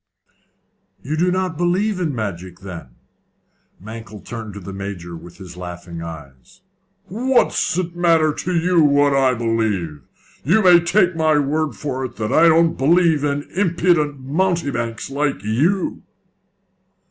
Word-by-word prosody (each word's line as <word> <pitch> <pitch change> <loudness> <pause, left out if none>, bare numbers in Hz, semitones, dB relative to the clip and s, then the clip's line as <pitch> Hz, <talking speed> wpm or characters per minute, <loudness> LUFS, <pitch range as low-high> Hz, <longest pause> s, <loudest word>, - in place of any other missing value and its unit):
"You 150 +4 -2
do 175 +3 +2
not 185 -3 -1
believe 185 +3 +1
in 160 -6 -1
magic, 95 -4 -5
then?" 85 -10 -9 0.8
Mankell 110 +1 -9
turned 110 -3 -7
to - - -6
the 95 +1 -8
Major 95 -3 -6
with 85 +1 -12
his 90 -3 -11
laughing 85 -1 -8
eyes. 75 - -11 0.4
"What's 240 -3 +1
it 175 -2 -2
matter 165 -3 +3
to 180 +3 -3
you 170 0 +3
what 145 -1 +4
I 135 -2 +3
believe? 110 -10 -1 0.4
You 210 +9 +3
may 180 -2 +7
take 180 +1 +2
my 155 -2 +2
word 150 +1 0
for 130 -3 -4
it 125 - -8
that 110 +1 -3
I 165 +1 +6
don't 165 0 +4
believe 160 +1 +3
in 145 0 -1
impudent 170 -6 +1
mountebanks 140 -6 -2
like 140 -7 -1
you." 155 - 0
145 Hz, 140 wpm, -20 LUFS, 105-170 Hz, 0.8 s, may